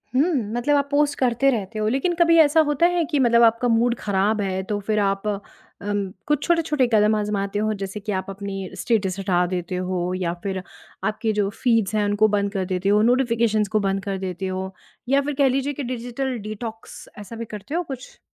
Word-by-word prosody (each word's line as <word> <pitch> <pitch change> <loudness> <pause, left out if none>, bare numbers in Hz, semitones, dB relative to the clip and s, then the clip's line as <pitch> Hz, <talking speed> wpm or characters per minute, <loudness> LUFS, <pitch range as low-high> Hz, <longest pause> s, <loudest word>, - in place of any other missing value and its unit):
हुँ, 315 +6 +3 0.2
मतलब 245 +5 +1
आप 280 0 0
पोस्ट 285 0 +2
करते 255 +1 +3
रहते 215 -2 -3
हो, 215 - 0
लेकिन 270 +9 +1
कभी 335 -1 +5
ऐसा 315 0 +5
होता 295 +4 +3
है 345 - +2
कि 290 -2 -1
मतलब 235 -2 +5
आपका 230 +2 +3
मूड 235 +1 +2
खराब 205 +1 +1
है 190 -1 -1
तो 205 - 0
फिर 215 -1 +2
आप 195 +1 0
उम, 205 -1 -5 0.2
कुछ 295 -1 +1
छोटे-छोटे 315 -6 +2
कदम 215 0 +4
आज़माते 205 -1 -1
हो 215 0 0
जैसे 195 +2 -4
कि 210 +1 -5
आप 190 0 -3
अपनी 195 -1 -5
स्टेटस 195 -2 0
हटा 180 -2 +1
देते 180 0 -3
हो 180 0 -2
या 175 -2 -1
फिर 190 -2 -2 0.4
आपके 220 0 -1
जो 205 -1 +1
फ़ीड्स 225 -2 +1
हैं 210 -1 +2
उनको 205 +1 +3
बंद 200 -1 0
कर 190 -2 -1
देते 185 +1 -1
हो, 210 +1 +4
नोटिफिकेशंस 230 -3 +2
को - - +5
बंद 195 -1 -1
कर 195 -1 -3
देते 190 0 -4
हो, 190 0 -4 0.4
या 280 +1 +4
फिर 295 +1 -3
कह 275 -1 +4
लीजिए 275 +2 0
कि 280 - -5
डिजिटल 250 +1 -3
डिटॉक्स, 220 +1 -8
ऐसा 210 +3 -9
भी 230 0 -5
करते 210 +10 -6
हो 350 - 0
कुछ? 270 -4 -9
215 Hz, 210 wpm, -23 LUFS, 195-255 Hz, 0.4 s, कभी